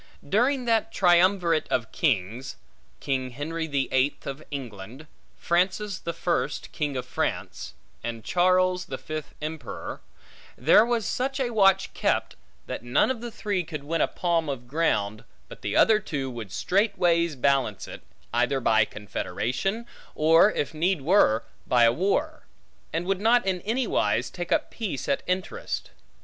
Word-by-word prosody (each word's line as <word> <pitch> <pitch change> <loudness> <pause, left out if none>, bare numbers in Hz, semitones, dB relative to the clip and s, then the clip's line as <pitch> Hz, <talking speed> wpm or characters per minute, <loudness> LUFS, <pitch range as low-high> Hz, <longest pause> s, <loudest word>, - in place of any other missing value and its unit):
During 250 - +2
that 225 -1 +1
triumvirate 175 -3 +3
of 120 -3 -1
kings, 120 - -1 0.4
King 130 -2 -2
Henry 160 +6 -4
the 140 -3 0
Eighth 130 +2 +1
of 140 +2 -5
England, 125 -1 -7 0.3
Francis 190 +3 0
the 170 - -4
First 170 +1 -2
King 145 -4 -2
of 125 - -4
France, - - -3 0.3
and 115 -1 -5
Charles 185 +3 +2
the 130 - -5
Fifth 155 +1 -7
Emperor, 155 -9 -6 0.6
there 215 - +6
was 235 -2 0
such 270 +2 -2
a 250 -3 0
watch 195 -3 +3
kept, - - 0 0.3
that - - -5
none 125 - +2
of 245 -3 -5
the 240 - -5
three 205 -4 -2
could 155 -3 -7
win 165 +2 -1
a - - +3
palm 170 -3 0
of 125 -3 -5
ground, 110 -8 0 0.2
but - - -12
the - - -3
other 220 -1 +5
two 140 -10 -4
would 115 -4 -7
straightways 175 - +1
balance 135 -6 +1
it, - - -9 0.3
either 125 +3 +2
by 110 -3 +3
confederation, 120 - -3 0.3
or, 165 +6 +5
if 145 - -2
need 165 -1 0
were, 135 - +4 0.2
by 125 -1 +4
a 115 0 +5
war; 290 - 0 0.5
and 165 +2 -2
would 195 +1 -1
not 235 +1 +4
in 185 -2 -1
any 240 +6 0
wise 115 - 0
take 175 -1 -6
up - - +1
peace 200 - -4
at - - +1
interest. 190 - -3
165 Hz, 155 wpm, -26 LUFS, 130-195 Hz, 0.6 s, there